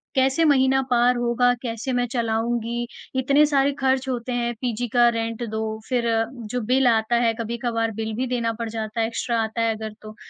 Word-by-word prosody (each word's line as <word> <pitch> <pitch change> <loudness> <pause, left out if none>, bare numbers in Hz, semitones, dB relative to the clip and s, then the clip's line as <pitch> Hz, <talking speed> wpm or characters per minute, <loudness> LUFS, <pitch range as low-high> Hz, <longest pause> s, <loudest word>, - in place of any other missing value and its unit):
कैसे 265 +4 +3
महीना 265 -2 +4
पार 245 0 +4
होगा 240 +1 +2
कैसे 230 +1 -4
मैं 245 0 +1
चलाऊँगी 235 0 -1 0.3
इतने 280 +3 +4
सारे 280 -1 +2
ख़र्च 265 0 +1
होते 250 0 -3
हैं 240 0 -1
पीजी 245 -1 -2
का 240 -1 +6
रेंट 230 0 -3
दो 220 0 -3 0.3
फ़िर 245 -2 0 0.5
जो 250 -1 -1
बिल 255 +1 +3
आता 225 0 +2
है 230 -1 +2
कभी-कभार 230 0 -2
बिल 220 0 -3
भी 255 +2 -1
देना 235 -2 -1
पड़ 230 - -3
जाता 220 0 -3
है 225 - +1
एक्स्ट्रा 230 0 -1
आता 220 +1 -3
है 225 -1 +1
अगर 220 0 -6
तो, 215 0 -10
240 Hz, 190 wpm, -23 LUFS, 225-250 Hz, 0.5 s, का